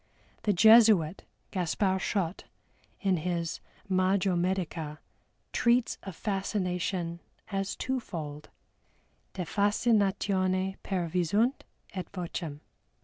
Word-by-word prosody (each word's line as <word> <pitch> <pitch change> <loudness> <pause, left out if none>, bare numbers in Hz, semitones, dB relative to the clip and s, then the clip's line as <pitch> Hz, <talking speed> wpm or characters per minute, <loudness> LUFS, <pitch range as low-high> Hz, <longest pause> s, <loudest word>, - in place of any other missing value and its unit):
The 210 - +2
Jesuit, 210 -4 +6 0.3
GASPAR 190 +1 +1
SCHOTT, 190 -3 -2 0.6
in 190 -3 +2
his 170 0 -2 0.3
Magio 185 0 +2
Medica 170 -4 -2 0.5
treats 240 0 +2
of 195 -4 -8
Fascination 180 -4 -2 0.3
as 195 0 -1
twofold: 165 - -4 0.9
De 180 -2 -3
Fascinatione 195 -2 +1
per 180 -3 -2
Visunt 200 - +1 0.3
et 185 -3 -5
Vocem. 170 -5 -5
185 Hz, 85 wpm, -29 LUFS, 170-200 Hz, 0.9 s, Jesuit